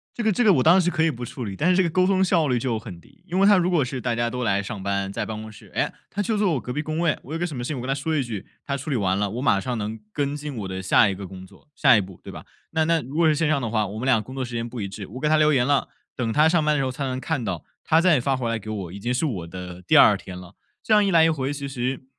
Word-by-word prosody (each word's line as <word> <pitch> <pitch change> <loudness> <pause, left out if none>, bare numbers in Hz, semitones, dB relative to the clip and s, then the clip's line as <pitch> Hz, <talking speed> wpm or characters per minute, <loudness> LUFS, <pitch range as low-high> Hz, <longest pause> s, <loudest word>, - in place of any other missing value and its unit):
这 - - -3
个 220 - +3
这 245 +5 +1
个 215 - +6
我 135 - +3
当 170 +4 +6
时 180 -1 +2
可 160 -2 +1
以 - - +3
不 125 -3 -8
处 120 +1 -6
理， 100 -2 -5
但 155 - +1
是 185 - +4
这 190 - +4
个 170 - 0
沟 185 +3 +2
通 190 0 +3
效 170 -4 +2
率 125 -1 +1
就 115 -2 -1
很 95 -5 -9
低。 135 - -23
因 180 +1 -1
为 195 - +5
他 205 - +7
如 180 0 +2
果 165 -5 +3
是 130 0 -4
大 120 0 -1
家 120 0 0
都 125 +1 -4
来 100 -3 +1
上 100 0 -6
班， 100 0 -1
在 - - -3
办 110 -1 -5
公 110 - -8
室， 105 - -16
诶， - - 0 0.2
他 205 - -3
就 215 +2 -1
坐 200 -4 +2
我 140 - 0
隔 125 - -6
壁 150 - -1
工 155 +1 -3
位， 165 -3 +1
我 140 - -12
有 165 - -3
个 175 - 0
什 155 - -7
么 120 - -4
事 - - -4
情 150 - -3
我 - - -4
跟 125 - -6
他 135 - +1
说 155 +3 -2
一 145 - +2
句， 110 -5 -6 0.2
他 140 - -2
处 140 +2 -6
理 140 - 0
完 95 -3 +1
了 100 0 0
我 115 +5 -4
马 100 -7 +3
上 125 0 -3
能 110 +1 -4
跟 145 +3 -2
进 150 0 -6
我 100 -3 -4
的 95 0 -5
下 95 +4 +4
一 95 - -2
个 100 +1 -7
工 95 0 -10
作 - - -21
下 135 -4 +5
一 105 - +3
步， 95 -2 -10
对 - - -8
吧？ - - -10 0.3
那 160 -1 +1
那 165 0 +2
如 135 +3 -9
果 170 +1 +3
是 155 - +4
线 160 +2 +1
上 150 -2 +1
的 115 - -2
话， 110 -2 0
我 100 +3 -7
们 120 - -4
俩 125 -5 +3
工 130 +5 -10
作 135 - -2
时 120 -1 -7
间 115 0 -2
不 120 -1 -6
一 100 - -3
致， 95 0 -8
我 125 +6 -8
给 150 - 0
他 155 - +4
留 155 0 +4
言 125 -3 +3
了， 145 +1 +2 0.3
等 115 -3 -1
他 150 +4 +5
上 165 -2 +2
班 150 0 +2
的 - - 0
时 - - +1
候 130 - -2
他 135 +2 -4
能 130 -1 -2
看 140 -2 -2
到， 90 -6 -3 0.2
他 160 +1 +3
再 170 -6 +4
发 135 +2 0
回 125 -3 -2
来 115 0 -1
给 110 +1 -9
我， 100 -5 -5
已 100 - -8
经 120 +5 -2 0.2
我 85 -4 -6
的 90 0 -8
第 - - +1
2 - - +7
天 90 -1 -9
了。 90 -1 -12 0.3
这 220 - +1
样 210 -1 +5
一 - - +1
来 165 -2 +6
一 165 - +5
回 140 -3 -1
其 140 -1 -5
实 130 0 -3
130 Hz, 385 characters per minute, -24 LUFS, 110-155 Hz, 0.3 s, 他